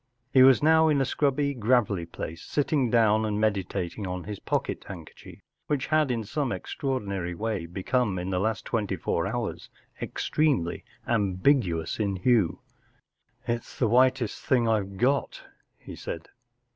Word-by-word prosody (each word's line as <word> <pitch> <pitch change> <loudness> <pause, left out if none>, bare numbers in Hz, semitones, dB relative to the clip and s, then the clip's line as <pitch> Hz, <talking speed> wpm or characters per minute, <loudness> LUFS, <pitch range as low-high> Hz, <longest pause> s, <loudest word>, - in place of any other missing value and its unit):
He 130 - +7
was 130 +1 +7
now 160 +1 +5
in 150 -3 +3
a 135 - +2
scrubby 140 +1 0
gravelly 110 -7 +1
place, 85 0 -7
sitting 145 -3 0
down 110 -2 +4
and 105 -1 -1
meditating 100 -2 -1
on 90 0 -4
his 105 -1 -6
pocket - - -2
hand¬ 85 -4 -7
kerchief, - - -14 0.3
which 145 -3 0
had 155 -2 +3
in 115 -3 -1
some 140 +5 -2
extraordi 130 -2 -3
nary 90 -3 -3
way 105 -4 -3
become 95 +3 -1
in 90 +2 -3
the 90 - 0
last 110 +2 -1
twenty 105 -4 -1
four 80 - -1
hours - - -4 0.3
ex¬ - - -4
tremely 140 - +1 0.3
ambigu¬ 100 - +2
ous 80 - -5
in 100 -2 0
hue* 105 -3 +2 0.9
It's 120 0 -3
the 120 - +2
whitest 125 0 +2
thing 120 -3 +2
I've 100 -3 0
got,” 135 +6 0 0.3
he - - -10
said. 85 0 -7
110 Hz, 160 wpm, -27 LUFS, 95-130 Hz, 0.9 s, He